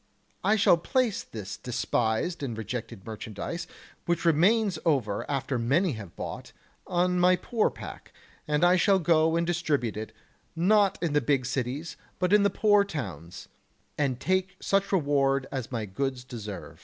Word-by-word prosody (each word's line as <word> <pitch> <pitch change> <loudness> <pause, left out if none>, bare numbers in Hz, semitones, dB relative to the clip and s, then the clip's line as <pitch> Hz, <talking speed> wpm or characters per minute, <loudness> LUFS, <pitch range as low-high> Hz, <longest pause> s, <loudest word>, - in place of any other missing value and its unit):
I 215 - +4
shall 200 -5 +5
place 245 +2 0
this 105 -2 -7
despised 120 +5 -1
and 120 -6 -4
rejected 110 -3 -6
merchandise, 115 - -6 0.4
which 170 -1 0
remains 185 +3 +3
over 125 - 0
after 135 -2 -1
many 150 +10 +2
have 105 -8 -8
bought, - - -7 0.3
on 180 0 +1
my 180 +1 +5
poor 215 +5 0
pack, - - -10 0.4
and 150 +2 +1
I 180 +1 +6
shall 195 +1 +4
go 160 -2 +3
and 170 0 +1
distribute 155 -10 0
it, 110 +1 -5 0.4
not 200 +4 +3
in 165 -4 0
the 150 - +3
big 130 0 +1
cities, 135 +5 -3 0.2
but 185 +2 +1
in 210 - +6
the 200 - +4
poor 205 +1 +4
towns, 95 - -7 0.5
and 135 -4 0
take 185 +5 0
such 195 0 +1
reward 140 -6 +2
as 130 -3 -4
my 115 -4 -2
goods 130 +5 -3
deserve. 110 -5 -8
150 Hz, 155 wpm, -27 LUFS, 125-180 Hz, 0.5 s, I